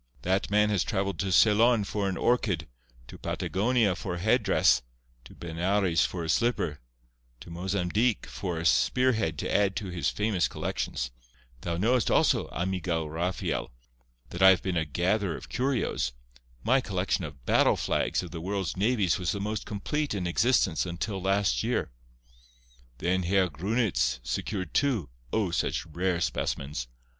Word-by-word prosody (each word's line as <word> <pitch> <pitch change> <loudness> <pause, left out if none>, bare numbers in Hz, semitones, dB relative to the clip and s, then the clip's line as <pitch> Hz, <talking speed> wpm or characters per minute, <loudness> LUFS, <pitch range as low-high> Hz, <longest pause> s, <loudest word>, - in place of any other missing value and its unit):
That 95 +2 0
man 105 +1 +3
has 100 - +2
travelled 100 -1 -2
to 95 -1 -1
Ceylon 110 +4 +5
for 100 0 -2
an 95 - -3
orchid—to 60 - -2
Patagonia 105 0 +1
for 90 - -4
a - - -5
headdress—to 60 - 0
Benares 85 +2 +1
for 90 -2 -5
a - - -4
slipper—to - - -3
Mozambique 95 +6 0
for 90 -4 -4
a 80 - -4
spearhead 110 - +2
to - - -2
add 100 -2 +2
to 95 +1 -4
his 90 -2 -1
famous 105 -5 0
collections. - - -3 0.5
Thou 85 -1 -2
knowest, 115 +5 +2
also, - - +3
amigo 90 -2 -2
Rafael, 80 -3 -2 0.6
that 85 - -5
I 95 - +9
have 95 -4 +4
been 95 -2 -1
a 80 -2 +1
gatherer 90 +5 0
of - - -11
curios. 125 - -1 0.5
My 130 +3 +3
collection 95 -3 -1
of 70 -5 -9
battle - - +4
flags - - 0
of 90 - -8
the 85 -2 -6
world's 95 -1 -2
navies 100 -2 +1
was 90 -2 0
the 100 - -4
most 105 +2 -3
complete 145 +6 -2
in 95 -3 -2
existence 95 - +2
until 95 +3 -4
last 95 -10 +1
year. - - -1 1.1
Then 90 +7 0
Herr 95 +1 +2
Grunitz 90 - 0
secured 85 - -3
two, 115 - +1 0.2
O! 105 -6 0
such 85 - -1
rare 90 +2 -1
specimens. 70 -6 -2
95 Hz, 150 wpm, -28 LUFS, 80-105 Hz, 1.1 s, I